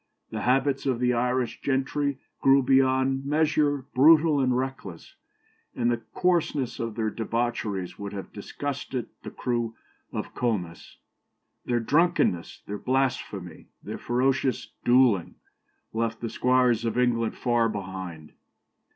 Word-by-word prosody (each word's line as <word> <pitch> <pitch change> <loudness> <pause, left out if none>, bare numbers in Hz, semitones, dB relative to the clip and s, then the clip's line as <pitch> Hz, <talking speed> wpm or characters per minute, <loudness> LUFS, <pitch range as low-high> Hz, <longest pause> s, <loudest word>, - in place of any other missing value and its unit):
The - - -4
habits 135 +2 +1
of 130 -3 +1
the 125 0 +2
Irish 125 +1 -1
gentry 140 +1 0 0.2
grew 135 0 +5
beyond 130 0 +3
measure 145 -2 +1
brutal 155 +2 +6
and 130 -2 +2
reckless, 130 -10 -5 0.6
and 120 -1 +1
the 120 -1 -1
coarseness 165 -7 0
of 115 -2 -3
their 110 -2 -1
debaucheries 115 -5 -2
would 100 -1 -5
have 100 -1 -7
disgusted 130 +3 -5
the - - -7
crew 120 -2 -2 0.4
of - - -5
Comus. 95 -9 -3 0.7
Their 120 -1 +1
drunkenness, 145 - +1
their 105 0 -5
blasphemy, 125 -9 -2 0.2
their - - -6
ferocious 130 +2 0
duelling, 120 -7 +3 0.6
left 115 0 -1
the 115 - -4
squires 125 -2 +2
of 115 +1 -1
England 120 -2 +1
far 120 -2 +2
behind. 95 -6 -6
125 Hz, 125 wpm, -26 LUFS, 115-135 Hz, 0.7 s, brutal